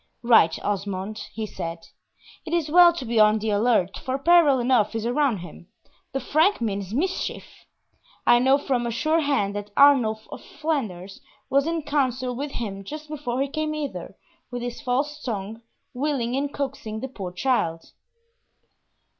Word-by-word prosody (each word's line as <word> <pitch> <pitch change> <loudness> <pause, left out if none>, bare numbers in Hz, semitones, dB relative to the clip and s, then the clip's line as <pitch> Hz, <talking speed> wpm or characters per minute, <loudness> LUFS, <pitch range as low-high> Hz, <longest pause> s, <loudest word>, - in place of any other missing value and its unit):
"Right, 225 -9 +5
Osmond," 200 +1 -3
he 220 0 -4
said. 165 -4 -6 0.6
"It 330 - -6
is 315 -3 -1
well 350 +1 +8
to 330 -7 -6
be 230 -1 0
on 215 0 +6
the 215 0 -2
alert, 205 -3 +1
for 260 +1 -2
peril 310 -2 +5
enough 240 -3 +2
is 225 0 -2
around 250 -1 +1
him 175 0 -11 0.4
The 270 - -2
Frank 315 +9 +2
means 200 -4 -3
mischief! 360 - -2 0.8
I 240 - +6
know 265 +2 +4
from 255 -4 -1
a - - -1
sure 310 +8 +1
hand 275 -10 0
that 205 0 -5
Arnulf 245 -7 +4
of - - -8
Flanders 215 - -4 0.3
was 275 +2 +3
in 330 -1 -1
council 255 -4 -1
with 280 +3 -5
him 195 -4 -5
just 305 +7 -8
before 275 -4 -2
he - - -3
came 310 +2 -2
hither, 300 -2 -5 0.3
with 245 -1 -5
his 245 -1 -5
false 290 +3 -1
tongue, 220 -1 -5 0.3
wiling 255 -3 -1
and 280 +1 -1
coaxing 255 -7 -4
the 265 - -3
poor 195 -8 -7
child!" 180 -6 -1
245 Hz, 165 wpm, -24 LUFS, 215-285 Hz, 0.8 s, well